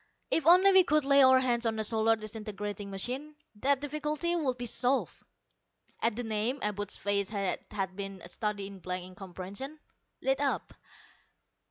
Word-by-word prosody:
"If 320 Hz, -1 st, +1 dB
only 365 Hz, +3 st, +7 dB
we 380 Hz, -1 st, +7 dB
could 305 Hz, -3 st, +2 dB
lay 275 Hz, 0 st, +6 dB
our 260 Hz, 0 st, +7 dB
hands 240 Hz, -2 st, +1 dB
on 220 Hz, -1 st, -1 dB
a 220 Hz, -, 0 dB
solar 225 Hz, +1 st, +3 dB
disintegrating 210 Hz, -2 st, -6 dB
machine, 255 Hz, +10 st, -3 dB, 0.2 s
the 265 Hz, +7 st, +2 dB
difficulty 300 Hz, +4 st, -2 dB
would 270 Hz, -7 st, 0 dB
be 245 Hz, -, -4 dB
solved." 250 Hz, +3 st, +1 dB, 0.8 s
At 230 Hz, -2 st, +2 dB
the 245 Hz, -, -3 dB
name, 220 Hz, +4 st, -1 dB
Abud's 205 Hz, -1 st, -2 dB
face, 200 Hz, -1 st, 0 dB
that 200 Hz, -3 st, -2 dB
had 190 Hz, -2 st, -3 dB
been 195 Hz, -1 st, -6 dB
a -, -, -8 dB
study 205 Hz, +2 st, -3 dB
in 195 Hz, -1 st, -9 dB
blank 180 Hz, 0 st, -4 dB
incomprehension, 190 Hz, -, -7 dB, 0.5 s
lit 270 Hz, +1 st, +2 dB
up. 280 Hz, -1 st, -1 dB
225 Hz, 165 wpm, -30 LUFS, 200-275 Hz, 0.8 s, only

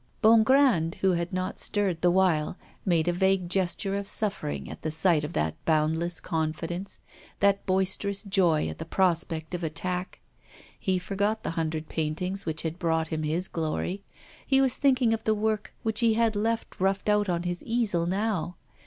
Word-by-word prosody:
Bongrand, 225 Hz, -, +5 dB
who 190 Hz, -, +4 dB
had 170 Hz, +1 st, -1 dB
not 185 Hz, 0 st, -3 dB
stirred 195 Hz, -5 st, 0 dB
the 175 Hz, -, +4 dB
while, 175 Hz, -3 st, +2 dB, 0.3 s
made 170 Hz, -3 st, +2 dB
a 175 Hz, -, +2 dB
vague 190 Hz, 0 st, +1 dB
gesture 190 Hz, +1 st, -1 dB
of 200 Hz, 0 st, -3 dB
suffering 75 Hz, -, -2 dB
at -, -, -9 dB
the 155 Hz, -, -2 dB
sight 160 Hz, 0 st, +3 dB
of 150 Hz, +3 st, -5 dB
that 80 Hz, +1 st, -2 dB
boundless 160 Hz, +2 st, +1 dB
confidence, 165 Hz, +3 st, -3 dB, 0.4 s
that 200 Hz, 0 st, +3 dB
boisterous 190 Hz, +2 st, 0 dB
joy 185 Hz, -6 st, +2 dB
at -, -, -7 dB
the 160 Hz, -, -5 dB
prospect 165 Hz, -2 st, 0 dB
of 175 Hz, -1 st, -3 dB
attack. 180 Hz, +3 st, -2 dB, 0.6 s
He 190 Hz, -1 st, 0 dB
forgot 200 Hz, +4 st, -1 dB
the -, -, -2 dB
hundred 160 Hz, -1 st, -3 dB
paintings 175 Hz, +5 st, -3 dB
which 160 Hz, 0 st, -1 dB
had 165 Hz, +2 st, -4 dB
brought 160 Hz, -2 st, 0 dB
him 160 Hz, -1 st, -2 dB
his 160 Hz, +4 st, -1 dB
glory, 170 Hz, +4 st, -3 dB, 0.4 s
he 270 Hz, -1 st, +4 dB
was 265 Hz, -2 st, +2 dB
thinking 255 Hz, -4 st, +3 dB
of 225 Hz, -, -3 dB
the 220 Hz, -, +2 dB
work 215 Hz, 0 st, -1 dB
which 220 Hz, -1 st, +1 dB
he 230 Hz, -2 st, +3 dB
had 225 Hz, -1 st, +2 dB
left 225 Hz, +2 st, -2 dB
roughed 195 Hz, +2 st, +1 dB
out 210 Hz, -1 st, +2 dB
on 175 Hz, -1 st, 0 dB
his 175 Hz, 0 st, -3 dB
easel 220 Hz, -8 st, 0 dB
now. 190 Hz, -2 st, -1 dB
185 Hz, 175 wpm, -27 LUFS, 165-205 Hz, 0.6 s, Bongrand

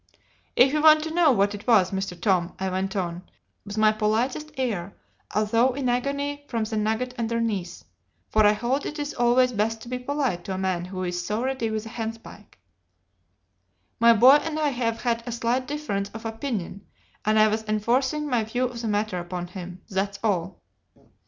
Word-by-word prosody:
"'If 265 Hz, +3 st, +5 dB
you 305 Hz, -, +2 dB
want 310 Hz, 0 st, +7 dB
to 320 Hz, 0 st, -4 dB
know 335 Hz, -3 st, +5 dB
what 205 Hz, -3 st, +2 dB
it 205 Hz, +3 st, -9 dB
was, 200 Hz, -6 st, +5 dB
Mr. 190 Hz, -2 st, -3 dB
Tom,' 180 Hz, -2 st, +1 dB
I 190 Hz, 0 st, -2 dB
went 190 Hz, +1 st, -2 dB
on, 175 Hz, -2 st, -2 dB, 0.4 s
with 205 Hz, +1 st, -8 dB
my 215 Hz, 0 st, +5 dB
politest 230 Hz, +8 st, -1 dB
air, 200 Hz, -8 st, -2 dB, 0.4 s
although 230 Hz, +4 st, +3 dB
in 270 Hz, -3 st, -1 dB
agony 280 Hz, +3 st, -1 dB
from 230 Hz, -3 st, -1 dB
the 220 Hz, +1 st, -4 dB
nugget 220 Hz, +4 st, -1 dB
underneath 225 Hz, -6 st, -2 dB, 0.5 s
for 215 Hz, -, +4 dB
I 210 Hz, 0 st, +6 dB
hold 245 Hz, +6 st, -1 dB
it 300 Hz, -, -6 dB
is 290 Hz, 0 st, -3 dB
always 245 Hz, +1 st, +3 dB
best 225 Hz, 0 st, -1 dB
to 240 Hz, -, -10 dB
be 250 Hz, 0 st, -3 dB
polite 255 Hz, -9 st, -2 dB
to 190 Hz, -, -3 dB
a -, -, -4 dB
man 185 Hz, -2 st, -1 dB
who 185 Hz, 0 st, -5 dB
is 175 Hz, -1 st, -2 dB
so 210 Hz, +5 st, -2 dB
ready 260 Hz, -3 st, -1 dB
with 220 Hz, 0 st, -3 dB
a -, -, -7 dB
handspike 225 Hz, -2 st, -7 dB, 1.4 s
'my 235 Hz, 0 st, +7 dB
boy 255 Hz, +6 st, +8 dB
and 310 Hz, +1 st, -4 dB
I 305 Hz, -1 st, +2 dB
have 235 Hz, -3 st, -2 dB
had 235 Hz, -2 st, 0 dB
a -, -, -3 dB
slight 235 Hz, +2 st, -1 dB
difference 245 Hz, -10 st, -3 dB
of 225 Hz, +1 st, -8 dB
opinion, 225 Hz, -5 st, -4 dB, 0.4 s
and 215 Hz, +1 st, +2 dB
I 215 Hz, 0 st, +6 dB
was 215 Hz, +1 st, -1 dB
enforcing 255 Hz, +8 st, 0 dB
my 245 Hz, -5 st, +1 dB
view 245 Hz, +4 st, -2 dB
of 240 Hz, -2 st, -5 dB
the 230 Hz, -, -3 dB
matter 210 Hz, -3 st, -1 dB
upon 175 Hz, 0 st, -5 dB
him; 180 Hz, 0 st, -9 dB
that's 200 Hz, +1 st, -2 dB
all. 185 Hz, -4 st, -1 dB
225 Hz, 190 wpm, -25 LUFS, 200-250 Hz, 1.4 s, boy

